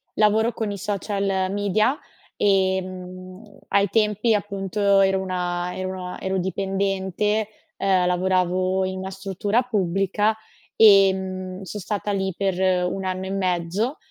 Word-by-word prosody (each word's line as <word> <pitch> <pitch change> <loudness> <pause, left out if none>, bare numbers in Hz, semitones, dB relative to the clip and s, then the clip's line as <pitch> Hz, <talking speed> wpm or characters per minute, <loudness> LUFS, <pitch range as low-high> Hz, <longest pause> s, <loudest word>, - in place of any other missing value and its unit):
lavoro 220 +2 +3
con 215 -2 -3
i 200 - -5
social 195 -1 -1
media 205 +6 +1 0.4
e, 190 -2 +2
mhmm, 185 +2 -10
ai 200 0 +3
tempi, 215 +1 +2
appunto, 200 0 +1
ero 190 0 +3
una 180 -1 -2
ero 185 0 -3
ua 185 -1 -6
ero 190 0 -1
dipendente, 195 +2 -1 0.3
ehm, 190 -2 +2
lavoravo 185 +1 +1
in 185 0 -4
una 190 0 -5
struttura 195 +4 -1
pubblica, 205 -1 0 0.4
ehm, 190 -2 +4
son 200 +3 -6
stata 205 +1 -3
lì 190 -1 -1
per 195 -2 0 0.4
1 195 - -4
anno 185 0 -3
e 190 - -5
mezzo. 190 - -1
190 Hz, 130 wpm, -23 LUFS, 185-205 Hz, 0.4 s, ehm